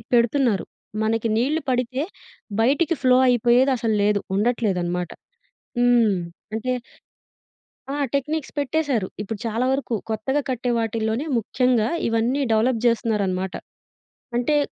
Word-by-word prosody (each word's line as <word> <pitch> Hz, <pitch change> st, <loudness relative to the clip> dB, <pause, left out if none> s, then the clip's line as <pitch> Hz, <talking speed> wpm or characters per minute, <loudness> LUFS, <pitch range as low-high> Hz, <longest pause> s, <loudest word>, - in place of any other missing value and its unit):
పెడుతున్నారు 235 Hz, -2 st, +2 dB, 0.4 s
మనకి 225 Hz, +1 st, +1 dB
నీళ్లు 290 Hz, +7 st, +1 dB
పడితే 255 Hz, +2 st, 0 dB, 0.6 s
బయటికి 290 Hz, +8 st, +3 dB
ఫ్లో 255 Hz, -1 st, +6 dB
అయిపోయేదసలు 240 Hz, -1 st, +3 dB
లేదు 205 Hz, 0 st, +3 dB, 0.2 s
ఉండట్లేదనమాట. 190 Hz, -6 st, 0 dB, 0.7 s
హ్మ్. 240 Hz, -4 st, +4 dB, 0.4 s
అంటే 255 Hz, +3 st, -1 dB, 1.2 s
ఆ! -, -, -2 dB, 0.2 s
టెక్నిక్స్ 300 Hz, +2 st, -2 dB
పెట్టేశారు. 280 Hz, -7 st, 0 dB
ఇప్పుడు 210 Hz, +1 st, -5 dB
చాలా 230 Hz, +2 st, 0 dB
వరకు 265 Hz, -3 st, -1 dB
కొత్తగా 255 Hz, +7 st, 0 dB
కట్టే 250 Hz, -1 st, -1 dB
వాటిల్లోనే 225 Hz, +3 st, -1 dB
ముఖ్యంగా 235 Hz, 0 st, +1 dB, 0.2 s
ఇవన్నీ 230 Hz, +5 st, +1 dB
డెవలప్ 225 Hz, +2 st, +2 dB
చేస్తున్నారన్నమాట. 200 Hz, -6 st, +1 dB, 0.8 s
అంటే 245 Hz, +5 st, +2 dB
235 Hz, 100 wpm, -23 LUFS, 220-255 Hz, 1.2 s, ఫ్లో